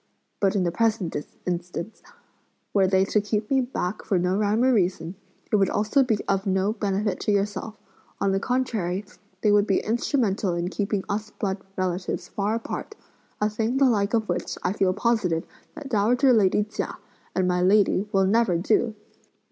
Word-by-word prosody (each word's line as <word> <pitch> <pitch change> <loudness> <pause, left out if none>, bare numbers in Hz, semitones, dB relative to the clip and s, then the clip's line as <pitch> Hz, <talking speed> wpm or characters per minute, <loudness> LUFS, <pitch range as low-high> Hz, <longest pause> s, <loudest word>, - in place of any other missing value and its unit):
But 195 0 +2
in 195 - +2
the 175 - 0
present 215 -3 0 0.3
instance, 180 +3 -4 0.7
were 195 -2 +4
they 190 0 +3
to 210 +1 +1
keep 210 +2 -2
me 270 -1 +4
back 220 -6 -3
for 195 - +1
no 180 +1 +1
rhyme 210 +3 +2
or 260 0 +4
reason, 180 -5 0 0.4
it 215 - +4
would 195 -2 +3
also 215 +7 +2
be 240 -5 +2
of 195 +1 0
no 190 +2 +1
benefit 205 -2 -1
to - - 0
yourself; 205 +2 -1 0.4
on 200 -1 +1
the 195 - +1
contrary, 210 -6 -1 0.4
they 210 - +3
would 205 0 +4
be 195 - +3
instrumental 220 -5 0
in 175 +1 -2
keeping 200 0 -2
us 215 +1 -3
blood 195 -1 -3 0.2
relatives 185 0 -2
far 205 +2 -1
apart; 230 - -5 0.4
a 210 - +2
thing 220 +4 -1
the 275 - +5
like 215 -3 +2
of 220 -2 0
which, - - -3
I 180 - +1
feel 190 -2 +2
positive 185 -6 0 0.3
that 280 - -8
dowager 245 +4 +3
lady 210 -2 +3
Chia 215 +1 -5 0.4
and 185 -1 +2
my 180 0 +1
lady 200 +1 +3
will 195 -1 +3
never 205 -3 +3
do!" 215 +5 +1
205 Hz, 180 wpm, -25 LUFS, 190-220 Hz, 0.7 s, the